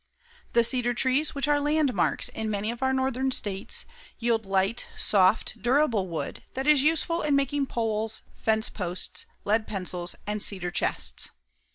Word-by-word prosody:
The 235 Hz, -, +5 dB
cedar 245 Hz, 0 st, +2 dB
trees, 265 Hz, +6 st, +2 dB
which 280 Hz, 0 st, 0 dB
are 295 Hz, 0 st, +3 dB
landmarks 295 Hz, -2 st, +1 dB
in 220 Hz, 0 st, -4 dB
many 210 Hz, +1 st, -1 dB
of 235 Hz, -, -9 dB
our 265 Hz, 0 st, +2 dB
northern 265 Hz, 0 st, 0 dB
states, 200 Hz, -6 st, -1 dB, 0.3 s
yield 230 Hz, -3 st, 0 dB
light, 195 Hz, +4 st, +1 dB
soft, 195 Hz, +1 st, +2 dB
durable 240 Hz, -4 st, +2 dB
wood 165 Hz, -2 st, -5 dB
that 265 Hz, +1 st, -2 dB
is 300 Hz, -2 st, +5 dB
useful 325 Hz, +3 st, +2 dB
in 295 Hz, -2 st, +2 dB
making 280 Hz, 0 st, +1 dB
poles, 220 Hz, -2 st, -2 dB
fence 220 Hz, 0 st, +1 dB
posts, 180 Hz, -2 st, -5 dB, 0.2 s
lead 215 Hz, +2 st, +1 dB
pencils 180 Hz, -3 st, -3 dB
and 210 Hz, 0 st, -2 dB
cedar 185 Hz, -4 st, +2 dB
chests. -, -, -1 dB
230 Hz, 155 wpm, -27 LUFS, 205-270 Hz, 0.3 s, The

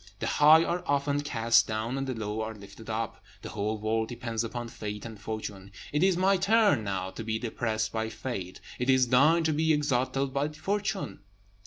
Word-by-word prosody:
The -, -, -4 dB
high 155 Hz, +2 st, +6 dB
are 175 Hz, +1 st, -1 dB
often 140 Hz, 0 st, +1 dB
cast 115 Hz, -5 st, +3 dB
down, 110 Hz, +3 st, -2 dB
and 135 Hz, 0 st, -2 dB
the 130 Hz, -, -2 dB
low 110 Hz, 0 st, -3 dB
are 110 Hz, 0 st, -4 dB
lifted 105 Hz, +2 st, -12 dB
up. 110 Hz, 0 st, -3 dB, 0.2 s
The -, -, -6 dB
whole 105 Hz, +1 st, -2 dB
world 110 Hz, +1 st, -1 dB
depends 115 Hz, -2 st, -3 dB
upon 120 Hz, +1 st, -5 dB
fate 105 Hz, -1 st, -6 dB
and 110 Hz, -3 st, -9 dB
fortune. 105 Hz, -3 st, -6 dB, 0.2 s
It 150 Hz, -, +1 dB
is 190 Hz, -2 st, +4 dB
my 190 Hz, +1 st, +3 dB
turn 205 Hz, -, +3 dB
now 95 Hz, -2 st, -3 dB
to 115 Hz, -, -7 dB
be 110 Hz, 0 st, -1 dB
depressed 110 Hz, -1 st, -2 dB
by 110 Hz, 0 st, -2 dB
fate; 95 Hz, -8 st, -5 dB, 0.2 s
it 125 Hz, +1 st, -1 dB
is 130 Hz, -2 st, +4 dB
thine 150 Hz, +7 st, +5 dB
to 160 Hz, -1 st, +1 dB
be 160 Hz, +2 st, +2 dB
exalted 135 Hz, -1 st, 0 dB
by 140 Hz, +1 st, +1 dB
fortune." 195 Hz, +6 st, -3 dB
120 Hz, 195 wpm, -28 LUFS, 110-145 Hz, 0.2 s, high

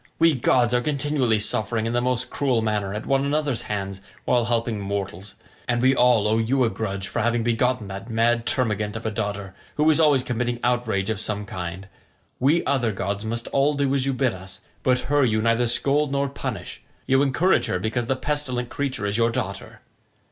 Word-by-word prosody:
We 165 Hz, -1 st, +5 dB
gods 125 Hz, -1 st, +2 dB
are 125 Hz, -, +3 dB
continually 140 Hz, -4 st, +1 dB
suffering 110 Hz, +1 st, 0 dB
in 115 Hz, -, -1 dB
the 120 Hz, -, +1 dB
most 125 Hz, 0 st, -1 dB
cruel 130 Hz, -5 st, +1 dB
manner 105 Hz, -3 st, -1 dB
at 105 Hz, +2 st, -5 dB
one 135 Hz, 0 st, +2 dB
another's 145 Hz, -3 st, 0 dB
hands 100 Hz, -2 st, -3 dB, 0.2 s
while 120 Hz, -2 st, +2 dB
helping 115 Hz, -2 st, -1 dB
mortals; 100 Hz, -1 st, -4 dB, 0.3 s
and 120 Hz, -1 st, +1 dB
we 130 Hz, +2 st, +4 dB
all 120 Hz, -5 st, +4 dB
owe 110 Hz, +1 st, +2 dB
you 125 Hz, +4 st, +2 dB
a 115 Hz, -, +1 dB
grudge 100 Hz, -3 st, -4 dB
for -, -, -2 dB
having 120 Hz, +1 st, +1 dB
begotten 120 Hz, 0 st, +1 dB
that 100 Hz, +4 st, -7 dB
mad 115 Hz, +1 st, +1 dB
termagant 105 Hz, -4 st, 0 dB
of 110 Hz, -, -6 dB
a 110 Hz, -, 0 dB
daughter, 100 Hz, -2 st, -4 dB, 0.2 s
who 150 Hz, +1 st, +2 dB
is 155 Hz, -, +2 dB
always 145 Hz, -5 st, +4 dB
committing 120 Hz, 0 st, -2 dB
outrage 115 Hz, -4 st, 0 dB
of 110 Hz, -, -3 dB
some 105 Hz, -1 st, -3 dB
kind. 95 Hz, 0 st, -6 dB, 0.5 s
We 145 Hz, +7 st, +2 dB
other 125 Hz, -5 st, +1 dB
gods 100 Hz, +1 st, -3 dB
must 115 Hz, +1 st, -3 dB
all 140 Hz, +2 st, +2 dB
do 140 Hz, -1 st, +1 dB
as 135 Hz, -1 st, +1 dB
you 135 Hz, -, +1 dB
bid 130 Hz, -2 st, +1 dB
us, 95 Hz, +2 st, -10 dB, 0.2 s
but 125 Hz, -1 st, +2 dB
her 145 Hz, 0 st, +2 dB
you 110 Hz, -3 st, +2 dB
neither 115 Hz, +2 st, +2 dB
scold 140 Hz, +4 st, +2 dB
nor 140 Hz, 0 st, 0 dB
punish; 140 Hz, -, -6 dB, 0.2 s
you 135 Hz, +1 st, +3 dB
encourage 145 Hz, +7 st, +2 dB
her -, -, 0 dB
because 115 Hz, +5 st, -2 dB
the 130 Hz, -, +1 dB
pestilent 130 Hz, -4 st, -2 dB
creature 135 Hz, -7 st, -3 dB
is 100 Hz, +1 st, 0 dB
your 115 Hz, 0 st, +3 dB
daughter. 100 Hz, -4 st, -5 dB
120 Hz, 200 wpm, -24 LUFS, 105-130 Hz, 0.5 s, We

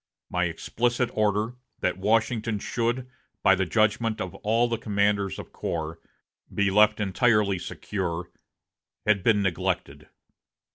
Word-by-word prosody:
My 90 Hz, 0 st, +1 dB
explicit 120 Hz, +8 st, -1 dB
order 110 Hz, +3 st, 0 dB, 0.2 s
that 90 Hz, 0 st, 0 dB
Washington 110 Hz, +2 st, +1 dB
should, 120 Hz, +4 st, -1 dB, 0.4 s
by 95 Hz, -, +7 dB
the 95 Hz, -1 st, 0 dB
judgment 110 Hz, +4 st, +1 dB
of 95 Hz, -, -4 dB
all 115 Hz, +3 st, +1 dB
the 115 Hz, -2 st, -2 dB
commanders 100 Hz, -2 st, +1 dB
of -, -, -9 dB
corps, 80 Hz, 0 st, -4 dB, 0.5 s
be 100 Hz, -1 st, +1 dB
left 105 Hz, +1 st, +5 dB
entirely 105 Hz, -1 st, +2 dB
secure, 90 Hz, -2 st, -4 dB, 0.7 s
had 105 Hz, -3 st, +3 dB
been 105 Hz, -1 st, +4 dB
neglected. 90 Hz, -4 st, -2 dB
105 Hz, 125 wpm, -26 LUFS, 95-115 Hz, 0.7 s, by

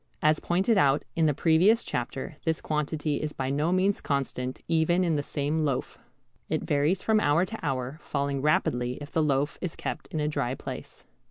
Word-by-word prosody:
As 155 Hz, 0 st, +4 dB
pointed 195 Hz, +5 st, +2 dB
out 140 Hz, -1 st, +3 dB
in 160 Hz, -1 st, +3 dB
the 150 Hz, -, +3 dB
previous 180 Hz, +10 st, +4 dB
chapter 130 Hz, +4 st, -4 dB
this 160 Hz, -1 st, 0 dB
quantity 150 Hz, -1 st, -1 dB
is 150 Hz, -1 st, -3 dB
by 130 Hz, 0 st, -2 dB
no 150 Hz, +4 st, +1 dB
means 190 Hz, +2 st, +2 dB
constant 130 Hz, -2 st, -2 dB
even 165 Hz, +2 st, +2 dB
in 170 Hz, -3 st, +1 dB
the 145 Hz, -, +1 dB
same 145 Hz, +2 st, -1 dB
loaf. 140 Hz, -4 st, -2 dB, 0.5 s
It -, -, -1 dB
varies 150 Hz, +6 st, +1 dB
from 220 Hz, -1 st, +3 dB
hour 150 Hz, +1 st, +3 dB
to 225 Hz, +3 st, -7 dB
hour, 135 Hz, 0 st, -2 dB
falling 140 Hz, -1 st, -2 dB
rapidly 125 Hz, -4 st, +1 dB
if 145 Hz, 0 st, -9 dB
the 160 Hz, -, +1 dB
loaf 145 Hz, 0 st, 0 dB
is 180 Hz, -4 st, -3 dB
kept -, -, -5 dB
in 155 Hz, -, -4 dB
a 150 Hz, -, 0 dB
dry 130 Hz, -4 st, -1 dB
place. -, -, -8 dB
150 Hz, 190 wpm, -27 LUFS, 140-165 Hz, 0.5 s, As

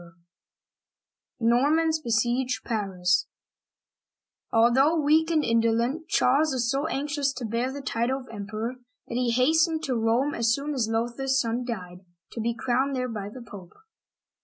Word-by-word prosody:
THE 230 Hz, -, -2 dB
NORMANS 310 Hz, +7 st, +3 dB
BESIEGE 240 Hz, -1 st, 0 dB
PARIS 185 Hz, -5 st, 0 dB, 1.2 s
ALTHOUGH 265 Hz, +8 st, +4 dB
weak 315 Hz, +3 st, +3 dB
and 315 Hz, -2 st, +2 dB
indolent, 230 Hz, +7 st, +1 dB
Charles 285 Hz, +4 st, +2 dB
was 240 Hz, -2 st, 0 dB
so 280 Hz, +3 st, -1 dB
anx 290 Hz, 0 st, -3 dB
ious 280 Hz, -1 st, +2 dB
to 245 Hz, -2 st, -5 dB
bear 235 Hz, +4 st, -1 dB
the 280 Hz, +1 st, -7 dB
title 250 Hz, +1 st, -1 dB
of 255 Hz, -, -15 dB
Emperor 215 Hz, +4 st, -5 dB, 0.3 s
that -, -, -7 dB
he 250 Hz, 0 st, +1 dB
hastened 315 Hz, +6 st, +2 dB
to 265 Hz, -5 st, -1 dB
Rome 235 Hz, +5 st, +1 dB
as 230 Hz, -1 st, +2 dB
soon 290 Hz, +2 st, -4 dB
as 240 Hz, -5 st, -1 dB
Lothair*s 240 Hz, +4 st, 0 dB
son 235 Hz, 0 st, -1 dB
died, 180 Hz, -6 st, -6 dB, 0.3 s
to 230 Hz, -, -5 dB
be 230 Hz, +1 st, -1 dB
crowned 265 Hz, +3 st, 0 dB
there 255 Hz, -1 st, -2 dB
by 205 Hz, -3 st, -5 dB
the 245 Hz, +3 st, -10 dB
Pope. 190 Hz, -6 st, -12 dB
245 Hz, 155 wpm, -26 LUFS, 230-280 Hz, 1.2 s, ALTHOUGH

